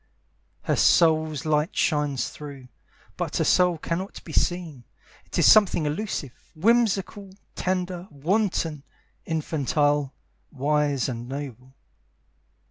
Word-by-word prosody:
Her - - +1
soul's 155 -3 +3
light 155 +3 0
shines 150 -4 0
through, 140 -4 -10 0.5
But - - -2
her - - +2
soul 180 -2 +3
cannot 170 +5 -4
be 160 - -10
seen. 165 -8 -1 0.4
It - - -5
is - - +4
something 200 -7 +5
elusive, 150 - -3 0.2
whimsical, 205 0 +1 0.2
tender, 180 -1 -2
wanton, 165 0 -1 0.5
infantile, 145 -3 0 0.4
wise 145 -1 0
And 120 -1 -5
noble. 130 -2 -7
155 Hz, 105 wpm, -25 LUFS, 145-180 Hz, 0.5 s, something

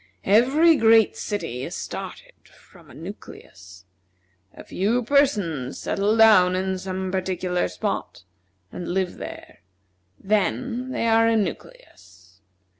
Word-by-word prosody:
Every 275 - +4
great 225 -2 +4
city 165 - -4
is - - -6
started - - -7
from - - -21
a - - -14
nucleus. 95 -2 -12 0.7
A - - -13
few 225 +6 -1
persons 205 - 0
settle 205 +3 -1
down 200 -5 +6
in 190 0 -2
some 185 0 -4
particular 185 -1 -1
spot, 90 0 -5 0.5
and 175 - -7
live 185 0 -2
there. - - -10 0.6
Then 235 +5 -1
they 260 - -2
are 225 0 +4
a 230 0 +2
nucleus. 90 - -7
190 Hz, 115 wpm, -23 LUFS, 180-225 Hz, 0.7 s, down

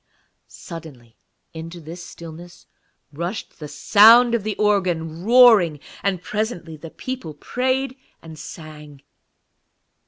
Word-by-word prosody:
Suddenly 145 -9 -11 0.4
into 165 +2 -8
this 170 +2 -9
stillness 170 +1 -12 0.5
rushed 175 +8 -6
the 150 - -7
sound 230 +8 +6
of 235 -4 0
the 215 0 -3
organ, 175 -6 0
roaring, 220 - +6 0.2
and 185 -2 -1
presently 210 -7 -4
the 160 +2 -10
people 250 - -7
prayed 260 - -2 0.2
and 160 -2 -12
sang. 150 -3 -11
175 Hz, 105 wpm, -21 LUFS, 160-215 Hz, 0.5 s, sound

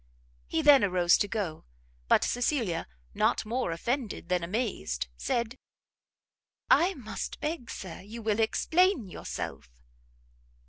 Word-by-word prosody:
He 320 - 0
then 290 -4 +8
arose 180 -3 +4
to 205 - +1
go, 195 -7 -3 0.4
but - - +5
Cecilia, 240 - 0 0.3
not - - +1
more 240 -1 -1
offended 225 +1 -3
than 180 -1 +1
amazed, 175 - -2
said, 235 - -2 1.1
"I 370 +3 +5
must 225 -6 -6
beg, 305 -5 -3
Sir, 185 -4 -7
you 220 +4 -9
will 215 0 +1
explain 325 - +3
yourself!" 170 - -6
220 Hz, 120 wpm, -29 LUFS, 180-260 Hz, 1.1 s, then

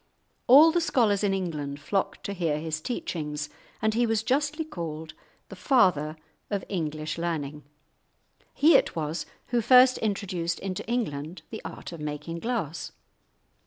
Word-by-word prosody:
All 295 +6 +9
the 345 +1 +1
scholars 220 -10 +2
in 200 - +2
England 150 -7 -3
flocked 195 +6 -2
to 200 - -3
hear 165 -5 0
his 155 0 -3
teachings, 150 -8 -4 0.3
and 220 0 +3
he 235 +1 +2
was 220 -1 +1
justly 295 +5 0
called 160 - -6 0.4
"the - - -8
father 175 - +3 0.3
of 200 -3 -2
English 155 -3 -3
learning." 150 -4 -3 0.9
He 315 +3 +6
it - - +3
was 160 +1 -3 0.2
who 240 -1 +2
first 255 +2 +6
introduced 190 -5 -1
into 185 -1 -4
England 175 -9 -3
the 220 - -6
art - - -8
of 170 - -8
making 150 +3 -5
glass. 195 - -3
180 Hz, 145 wpm, -27 LUFS, 155-230 Hz, 0.9 s, All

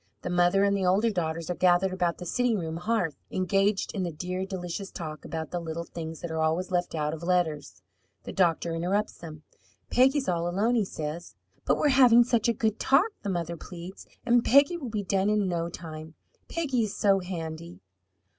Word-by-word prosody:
The 180 - -3
mother 175 +2 +3
and 200 0 +3
the 195 - -1
older 195 +5 +3
daughters 165 -3 -2
are - - -2
gathered 185 +1 +3
about 175 -2 0
the 180 - -8
sitting 245 +4 +1
room 165 -3 -4
hearth, 180 -3 0 0.2
engaged 195 +2 +1
in 200 - -2
the 175 -2 -2
dear, 180 +4 -4
delicious 190 +1 -5
talk 155 -3 -7
about 160 -2 -5
the 175 - -2
little 165 0 -5
things 165 -1 -7
that 170 - -5
are 160 0 -1
always 165 +4 0
left 175 -2 -1
out 150 -1 -1
of 160 - -7
letters. 155 - -1 0.4
The - - -7
doctor 170 -2 +1
interrupts 185 +6 -1
them. 155 -2 -10 0.5
"Peggy 265 +3 +4
is 270 - -2
all 170 -1 0
alone," 205 +7 +1
he 225 -4 +2
says. 160 0 -6 0.3
"But - - +2
we're 300 - +2
having 250 -3 +7
such 235 -2 +1
a 235 - +3
good 220 -1 -1
talk," 360 +12 +3
the 200 - -4
mother 170 -2 -2
pleads, 180 +2 -10 0.2
"and 240 0 +4
Peggy 280 +6 +5
will 280 -8 -5
be 210 -2 -2
done 195 +1 +1
in 210 -2 +2
no 170 -1 -1
time! 160 -2 -9 0.3
Peggy 280 -8 0
is 205 - -6
so 195 -1 +3
handy!" 170 -2 -6
180 Hz, 200 wpm, -27 LUFS, 165-210 Hz, 0.5 s, having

